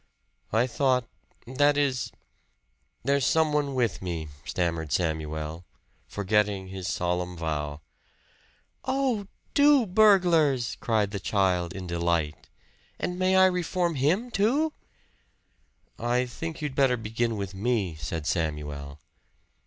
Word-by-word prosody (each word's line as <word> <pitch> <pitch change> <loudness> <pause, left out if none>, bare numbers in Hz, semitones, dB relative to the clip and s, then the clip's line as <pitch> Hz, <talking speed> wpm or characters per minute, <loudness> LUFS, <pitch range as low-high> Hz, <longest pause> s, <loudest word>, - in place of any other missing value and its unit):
"I 115 +3 +3
thought 130 -1 +1 0.4
that 145 +4 +2
is 135 -4 0 0.9
there's 140 +2 +2
some 160 +3 +3
one 145 -2 0
with 120 -5 0
me," 85 -4 -4 0.2
stammered 85 -4 -2
Samuel, 80 0 -2 0.4
forgetting 100 -1 0
his 95 -1 -5
solemn 90 0 -1
vow. 75 -2 -3 1.0
"Oh! 260 -6 0 0.3
two 285 -3 +5
burglars!" 175 - +4
cried 110 -3 +1
the 100 - -3
child 90 -3 +1
in 95 -1 -6
delight. 85 -3 -1 0.5
"And 180 0 -3
may 185 0 +3
I 190 0 +7
reform 180 -1 +1
him, 170 - +1
too?" 275 +10 +2 1.3
"I 120 +1 +1
think 160 +5 -6
you'd 145 -3 -2
better 130 -2 +3
begin 115 +1 -2
with 100 -1 -4
me," 100 -3 0
said 75 +1 -5
Samuel. 75 -4 -3
115 Hz, 115 wpm, -27 LUFS, -, 1.3 s, I